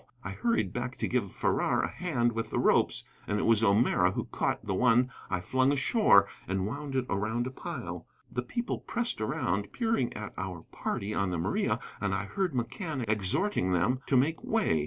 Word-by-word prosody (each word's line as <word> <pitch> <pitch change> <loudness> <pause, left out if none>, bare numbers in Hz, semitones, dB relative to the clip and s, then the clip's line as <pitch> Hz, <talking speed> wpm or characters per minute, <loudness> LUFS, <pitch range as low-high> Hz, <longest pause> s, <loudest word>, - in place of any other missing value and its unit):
I - - -4
hurried 235 -1 0
back 125 +1 -3
to - - -1
give 115 -7 0
Farrar - - +1
a - - +1
hand 125 -10 0
with 115 -1 -3
the - - -2
ropes, - - +3 0.2
and 105 - 0
it - - 0
was 115 -1 +4
O'Meara 105 +2 +4
who - - -1
caught - - -2
the - - -1
one 125 +3 +4 0.2
I 90 -2 -1
flung 130 +6 +2
ashore 140 - +5 0.2
and 95 0 0
wound 140 +5 -4
it 130 -1 +1
around 110 +5 -1
a 130 - -4
pile. 120 - -6 0.2
The 125 - -1
people 235 - -3
pressed 235 - -2
around, 100 -1 -1
peering 225 - 0
at 105 -1 -6
our 90 -3 -5
party 100 +2 -3
on 100 -2 0
the 90 - -1
Maria, 80 - 0 0.2
and 100 -2 0
I 100 +1 -2
heard 180 - -1
McCann 130 - -3
exhorting 105 - +1
them 95 +9 +2
to 135 - +4
make 150 +6 +1
way. 220 - +2
120 Hz, 195 wpm, -30 LUFS, 100-140 Hz, 0.2 s, ashore